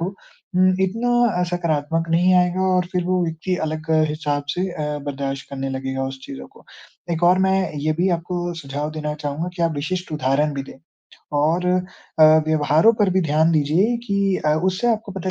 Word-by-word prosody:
को -, -, -1 dB, 0.5 s
उम, 185 Hz, +1 st, +4 dB
इतना 220 Hz, +6 st, 0 dB, 0.3 s
अ, -, -, +2 dB
सकारात्मक 165 Hz, -2 st, -1 dB
नहीं 180 Hz, +3 st, +4 dB
आएगा 180 Hz, 0 st, +2 dB
और 180 Hz, -1 st, +1 dB
फिर 180 Hz, -1 st, 0 dB
वो 180 Hz, 0 st, +1 dB
व्यक्ति 165 Hz, +3 st, -2 dB
अलग 155 Hz, +1 st, -5 dB, 0.2 s
हिसाब 150 Hz, -1 st, -2 dB
से 185 Hz, +2 st, -1 dB
अ, 150 Hz, -3 st, -3 dB
बर्दाश्त 135 Hz, -1 st, -4 dB
करने 135 Hz, -1 st, -4 dB
लगेगा 135 Hz, 0 st, -3 dB
उस 135 Hz, 0 st, -7 dB
चीज़ों 65 Hz, 0 st, -8 dB
को। -, -, -17 dB, 0.5 s
एक 165 Hz, -, -3 dB
और 180 Hz, +1 st, +5 dB
मैं 190 Hz, -2 st, +1 dB
ये 155 Hz, +2 st, 0 dB
भी 185 Hz, -, +3 dB
आपको 175 Hz, +1 st, -4 dB
सुझाव 145 Hz, -1 st, -5 dB
देना 150 Hz, -1 st, -4 dB
चाहूँगा 150 Hz, +3 st, -4 dB
कि 170 Hz, -, -2 dB
आप 165 Hz, -, +2 dB
विशिष्ट 180 Hz, +3 st, -3 dB
उदाहरण 145 Hz, +1 st, +1 dB
भी 135 Hz, -, -3 dB
दें 135 Hz, -, -13 dB, 0.6 s
और 165 Hz, +5 st, +1 dB
अ, 180 Hz, -2 st, -1 dB, 0.2 s
व्यवहारों 155 Hz, +6 st, +4 dB
पर 205 Hz, -2 st, +4 dB
भी 190 Hz, +1 st, +2 dB
ध्यान 160 Hz, +2 st, +3 dB
दीजिए 165 Hz, +10 st, +2 dB
कि 200 Hz, -2 st, +1 dB
अ, 150 Hz, -, +4 dB
उससे 190 Hz, +6 st, +1 dB
आपको 215 Hz, -3 st, -4 dB
पता 190 Hz, -1 st, -4 dB
165 Hz, 190 wpm, -21 LUFS, 150-185 Hz, 0.6 s, और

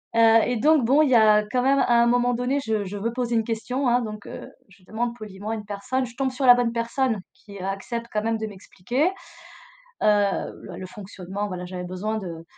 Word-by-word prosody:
heu 225 Hz, 0 st, +6 dB
et 245 Hz, 0 st, -1 dB
donc, 300 Hz, +2 st, +4 dB
bon, 275 Hz, +6 st, +4 dB
il 295 Hz, -, +2 dB
y -, -, +6 dB
a 215 Hz, -2 st, +6 dB
quand 250 Hz, -1 st, +1 dB
même 270 Hz, +2 st, +3 dB
à 240 Hz, -2 st, +4 dB
un 235 Hz, -, +4 dB
moment 245 Hz, +1 st, +2 dB
donné, 250 Hz, +4 st, 0 dB
je 220 Hz, -2 st, 0 dB
je 200 Hz, +2 st, -6 dB
veux 230 Hz, +3 st, -2 dB
poser 240 Hz, -1 st, -1 dB
une 225 Hz, -, +2 dB
question, 245 Hz, +4 st, -2 dB
hein, 245 Hz, +1 st, +3 dB
donc 215 Hz, -2 st, -7 dB
heu, -, -, -8 dB, 0.2 s
je 190 Hz, 0 st, -21 dB
demande 235 Hz, +4 st, -3 dB
poliment 210 Hz, -2 st, -8 dB
à 225 Hz, -, -1 dB
une 215 Hz, -1 st, -7 dB
personne. 210 Hz, +6 st, -2 dB
Je 235 Hz, -, -14 dB
tombe 265 Hz, -1 st, 0 dB
sur 260 Hz, +1 st, -2 dB
la 245 Hz, -, +10 dB
bonne 245 Hz, -1 st, +1 dB
personne 235 Hz, 0 st, 0 dB
qui 200 Hz, -1 st, -13 dB
accepte 200 Hz, +5 st, -4 dB
quand 210 Hz, 0 st, -1 dB
même 225 Hz, 0 st, 0 dB
de 220 Hz, 0 st, -4 dB
m'expliquer, 205 Hz, -, -3 dB, 1.0 s
heu, -, -, +3 dB
l 205 Hz, -2 st, +2 dB, 0.3 s
le 185 Hz, -, -6 dB
fonctionnement, 195 Hz, +1 st, -6 dB
voilà, 180 Hz, -2 st, -6 dB
j'avais 180 Hz, 0 st, -6 dB
besoin 185 Hz, +5 st, -3 dB
de 170 Hz, -5 st, -7 dB
225 Hz, 230 wpm, -24 LUFS, 205-245 Hz, 1.0 s, la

